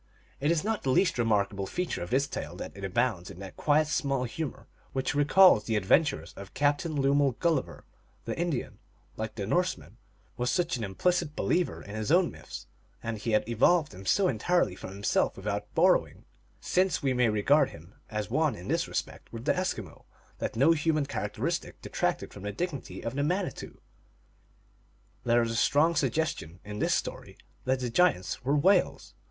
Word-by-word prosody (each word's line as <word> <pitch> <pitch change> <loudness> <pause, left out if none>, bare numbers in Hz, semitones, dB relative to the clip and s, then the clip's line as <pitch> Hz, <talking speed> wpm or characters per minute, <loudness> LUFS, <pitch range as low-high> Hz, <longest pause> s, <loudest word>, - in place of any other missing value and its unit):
It 145 +3 +1
is 170 0 +2
not. 220 0 -1
the 135 - -2
least 150 +1 +2
remarkable 100 -3 +1
feature 180 - -3
of 85 - -5
this 135 +2 +2
tale - - -6
that - - -7
it 100 - -9
abounds 95 -2 0
in - - -10
that 95 -1 -9
quiet 150 +1 +3
small 140 -3 0
humor 140 +4 -5 0.3
which 130 0 -1
re 145 0 +2
calls 180 - +6
the 110 - 0
adventures 135 - +2
of 100 0 -11
Captain 145 +2 +1
Lemuel 140 0 +3
Gulliver. 160 0 -1 0.4
The - - -3
Indian, 170 -6 -3 0.4
like 110 0 -5
the 100 -3 -3
Norseman, 105 - -1 0.4
was 125 0 0
such 175 -4 +1
an 120 - -4
implicit 160 - 0
believer 180 +1 0
in 100 - -9
his 110 +5 -2
own 175 +1 +4
myths, - - -10 0.4
and 115 -1 -3
he 115 +1 -2
had 105 - +2
evolved 150 +8 +3
them 95 +1 -10
so 200 -2 +3
entirely 155 - +1
from - - -8
himself 100 +2 0
without 105 +1 -4
borrowing, - - +2 0.3
since 185 -3 +1
we 135 -2 +2
may 125 -2 +3
regard 110 +8 +3
him 85 +5 -14 0.2
as 105 -2 -3
one 150 +5 +1
in 90 - -9
this - - +1
respect - - -5
with 115 +1 -8
the - - +3
Eskimo, 110 - -4 0.3
that - - -3
no 135 +8 +5
human 155 -2 +1
characteristic 105 -6 -3
detracted - - -2
from 100 - -10
the 105 +1 -4
dignity 150 - -5
of 115 - -3
the 140 - -1
Manitou, 175 - -2 1.5
There 120 0 +4
is 115 - -2
a - - -3
strong 155 +8 +3
suggestion 135 - -1
in 105 0 -6
this - - +2
story - - -5 0.3
that 130 0 +1
the 125 -2 -2
giants 130 - +1
were 140 +3 +1
whales. 185 +5 +2
130 Hz, 180 wpm, -29 LUFS, 105-160 Hz, 1.5 s, calls